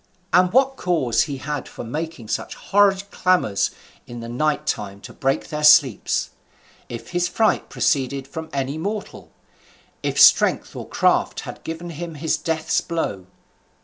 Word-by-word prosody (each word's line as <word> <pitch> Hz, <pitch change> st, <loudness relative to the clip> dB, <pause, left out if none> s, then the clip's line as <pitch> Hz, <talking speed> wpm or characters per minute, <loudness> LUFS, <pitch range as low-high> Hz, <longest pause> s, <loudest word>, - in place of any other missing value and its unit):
and 180 Hz, 0 st, +5 dB
what 270 Hz, +2 st, +3 dB
cause 140 Hz, -, +1 dB
he 140 Hz, -, -3 dB
had 145 Hz, +1 st, -4 dB
for -, -, -8 dB
making 150 Hz, 0 st, -5 dB
such -, -, -3 dB
horrid 200 Hz, -1 st, +3 dB
clamours 180 Hz, -, +1 dB, 0.4 s
in 120 Hz, 0 st, -8 dB
the 115 Hz, -, -7 dB
night 145 Hz, +6 st, -1 dB
time 100 Hz, -1 st, -3 dB
to -, -, -11 dB
break 135 Hz, +5 st, -1 dB
their 150 Hz, -1 st, -4 dB
sleeps? 145 Hz, -7 st, +4 dB, 0.6 s
if 115 Hz, -, -8 dB
his 175 Hz, 0 st, 0 dB
fright 215 Hz, +5 st, +1 dB
proceeded 135 Hz, -1 st, 0 dB
from 160 Hz, +2 st, -7 dB
any 140 Hz, +2 st, -2 dB
mortal? 205 Hz, +4 st, -5 dB, 0.7 s
if -, -, -1 dB
strength -, -, +5 dB
or -, -, -7 dB
craft -, -, +1 dB
had -, -, -9 dB
given 165 Hz, +2 st, -6 dB
him 165 Hz, +1 st, -7 dB
his 155 Hz, +2 st, 0 dB
death's 160 Hz, +1 st, -1 dB
blow? 100 Hz, -, -3 dB
155 Hz, 150 wpm, -22 LUFS, 130-175 Hz, 0.7 s, and